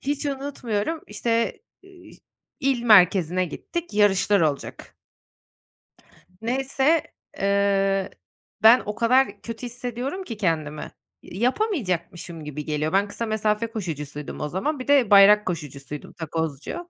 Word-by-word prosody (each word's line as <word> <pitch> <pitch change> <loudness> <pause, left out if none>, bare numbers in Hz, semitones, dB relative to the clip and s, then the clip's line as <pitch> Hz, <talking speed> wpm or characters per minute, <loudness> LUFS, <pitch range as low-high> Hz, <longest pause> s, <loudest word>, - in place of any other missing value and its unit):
Hiç 285 +2 -2
unutmuyorum, 275 -1 -3
işte, 230 +2 -1 0.2
ııı, 380 -2 -16 0.5
il 265 -3 +1
merkezine 185 -5 +5
gittik 340 - -6
yarışlar 205 -1 +3
olacak. 150 -4 -3 1.5
Neyse, 270 +6 +1 0.3
eee, 195 -1 +1 0.5
ben 230 +3 +8
o 210 - -4
kadar 235 -3 +2
kötü 230 +1 -7
hissediyorum 245 - -5
ki 230 - -7
kendimi 155 -6 -2 0.3
yapamayacakmışım 185 - -2
gibi 150 0 -6
geliyor. 155 +1 -2
Ben 200 +1 +3
kısa 230 +3 -4
mesafe 215 0 0
koşucusuydum 150 - -6
o 150 - -3
zaman. 265 - -2
Bir 255 - -7
de 280 -6 +4
bayrak 205 +1 +7
koşucusuydum 150 -4 -6
Takozcu. 160 - -5
210 Hz, 115 wpm, -24 LUFS, 175-250 Hz, 1.5 s, ben